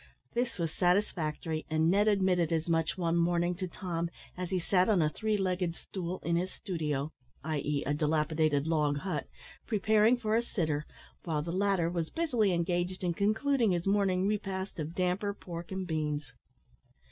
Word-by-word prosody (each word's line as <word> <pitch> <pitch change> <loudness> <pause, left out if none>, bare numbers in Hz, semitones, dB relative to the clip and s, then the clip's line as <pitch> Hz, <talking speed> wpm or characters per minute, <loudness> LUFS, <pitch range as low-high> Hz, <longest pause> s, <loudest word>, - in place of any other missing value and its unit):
This 240 -1 -1
was 165 -3 -1
satisfactory, 165 -4 0
and 160 +1 +3
Ned 205 +3 +3
admitted 185 -5 +3
as 160 0 0
much 165 +1 +1
one 170 -2 +1
morning 175 +1 +2
to 185 0 -3
Tom, 170 -2 -3 0.3
as 180 -1 -4
he 190 - 0
sat 180 +2 +2
on 205 -4 +4
a 155 -2 +2
three 215 +5 0
legged 180 -3 0
stool 180 -1 -5
in 170 0 +1
his 185 +2 -1
studio 155 -6 -3 0.3
i.e. 150 -2 -1
a 145 - +1
dilapidated 150 -1 +1
log 150 -3 +1
hut 185 +6 -3 0.4
preparing 215 +2 +4
for 220 -2 0
a 230 - +4
sitter, 155 -10 -2 0.4
while 155 -3 -1
the 170 - -4
latter 190 -2 +2
was 170 -2 -2
busily 245 - +1
engaged 175 +2 -1
in 175 -1 +1
concluding 220 +3 +2
his 175 -1 -1
morning 195 -2 +2
repast 195 -3 -2
of 155 +2 -4
damper, 185 +3 0
pork, 170 -2 -8
and 190 0 -3
beans. 150 -3 -2
175 Hz, 170 wpm, -31 LUFS, 160-195 Hz, 0.4 s, on